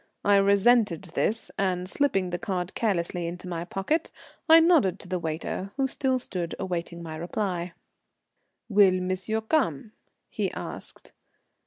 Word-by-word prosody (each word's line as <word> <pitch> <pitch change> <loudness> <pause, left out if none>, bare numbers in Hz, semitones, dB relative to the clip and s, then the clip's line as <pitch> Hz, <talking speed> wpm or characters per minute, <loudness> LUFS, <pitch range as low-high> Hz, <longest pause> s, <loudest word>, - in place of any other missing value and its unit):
I 205 0 +6
resented 200 -1 +4
this, 225 +2 -1
and 185 -2 0
slipping 195 -7 0
the 175 - -2
card 185 -4 -3
carelessly 175 -5 -1
in 170 +1 -5
my 170 -2 -4
pocket, 195 - -1 0.4
I 325 +1 +10
nodded 310 - +4
to - - -12
the 185 0 -2
waiter, 170 +4 -4
who 270 -1 +2
still 265 -1 0
stood 180 -8 -4
awaiting 170 -2 -4
my 160 -1 -6
reply. 175 +1 -3 0.9
"Will 195 -4 +5
monsieur 185 +4 -1
come?" 220 - 0 0.4
he - - -2
asked. - - -8
190 Hz, 140 wpm, -27 LUFS, 175-220 Hz, 0.9 s, I